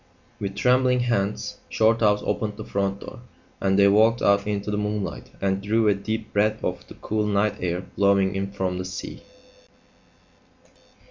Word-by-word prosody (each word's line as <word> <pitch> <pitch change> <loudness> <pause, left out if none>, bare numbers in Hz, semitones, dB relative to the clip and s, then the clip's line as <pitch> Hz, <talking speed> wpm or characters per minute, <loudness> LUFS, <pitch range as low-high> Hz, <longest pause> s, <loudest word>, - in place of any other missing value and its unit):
With 100 -1 -4
trembling 125 +2 +3
hands 105 -4 -1
Shorthouse 110 -2 +3
opened 105 -2 -2
the 110 - -7
front 100 0 -2
door, - - -9 0.4
and 95 0 +2
they 100 0 +6
walked 110 +4 +4
out 100 0 +3
into 105 0 -2
the 105 - -1
moonlight 105 -1 -3
and 95 0 0
drew 110 +2 +1
a 105 - +5
deep 110 +3 -5
breath 105 +1 +1
of - - -3
the - - -12
cool 105 0 -2
night 105 0 +1
air 90 0 -2
blowing 100 0 +1
in 95 0 -3
from 95 -2 -2
the 90 - -4
sea. 90 -2 -7
100 Hz, 160 wpm, -24 LUFS, 100-110 Hz, 0.4 s, they